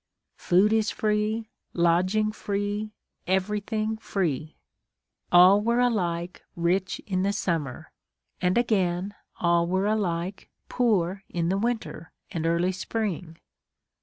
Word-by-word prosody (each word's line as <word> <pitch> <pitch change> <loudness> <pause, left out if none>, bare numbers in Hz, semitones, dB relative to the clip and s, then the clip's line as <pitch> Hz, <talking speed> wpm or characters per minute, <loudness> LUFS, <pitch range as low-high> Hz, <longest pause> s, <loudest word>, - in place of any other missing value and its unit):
Food 195 +4 +3
is 220 -1 +2
free 215 +1 -1 0.2
lodging 185 +5 +2
free 205 +1 -3 0.4
everything 210 +3 -1
free! 160 - -2 0.8
All 185 +3 +7
were 235 +3 +1
alike 180 -8 -1
rich 180 +3 0
in 185 -2 -1
the 200 +1 +1
summer, 165 -10 -3 0.5
and, 180 +2 +2
again, 195 -5 +1 0.3
all 170 -1 +2
were 190 +2 0
alike 195 -3 -2 0.2
poor 195 -6 +1
in 170 -1 -1
the 190 - +1
winter 225 -8 -3 0.2
and 165 -4 -2
early 170 +2 +2
spring. 185 -4 -4
190 Hz, 110 wpm, -26 LUFS, 175-215 Hz, 0.8 s, All